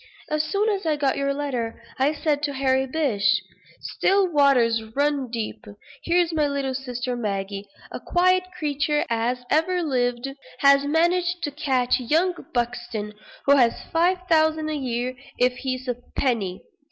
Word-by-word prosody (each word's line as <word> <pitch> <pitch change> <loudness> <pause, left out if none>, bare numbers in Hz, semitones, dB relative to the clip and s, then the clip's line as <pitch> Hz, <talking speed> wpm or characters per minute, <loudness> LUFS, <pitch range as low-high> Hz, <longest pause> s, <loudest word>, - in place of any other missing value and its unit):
As 305 0 +2
soon 405 +6 0
as 400 -2 -1
I 315 -2 +1
got 280 -2 +1
your 275 0 0
letter 265 -5 -3 0.2
I 275 +3 +3
said 300 -1 -1
to 290 -1 -1
Harry 265 0 +1
Bish 255 -9 +1 0.4
'Still 390 0 +2
waters 250 -6 +4
run 285 -2 +1
deep; 230 -1 -4 0.4
here's 345 -1 +2
my 305 -2 +2
little 280 -2 -2
sister 250 -1 -3
Maggie, 200 -3 -3 0.3
as - - -5
quiet 365 +1 +3
a 365 -1 -17
creature 295 -1 0
as 240 +2 0
ever 350 +3 +2
lived, 245 -3 0 0.3
has 280 0 +6
managed 345 +3 +1
to 290 - -1
catch 265 -4 +1
young 320 +9 +2 0.2
Buxton, 240 -3 -3 0.3
who 280 0 +6
has 240 -3 +3
five 350 +3 +3
thousand 315 -2 +2
a 310 - -2
year 250 -2 -2 0.2
if 250 0 +3
he's 255 -1 -4
a 245 -1 -1 0.2
penny.' 215 -9 -1
275 Hz, 155 wpm, -24 LUFS, 245-315 Hz, 0.4 s, has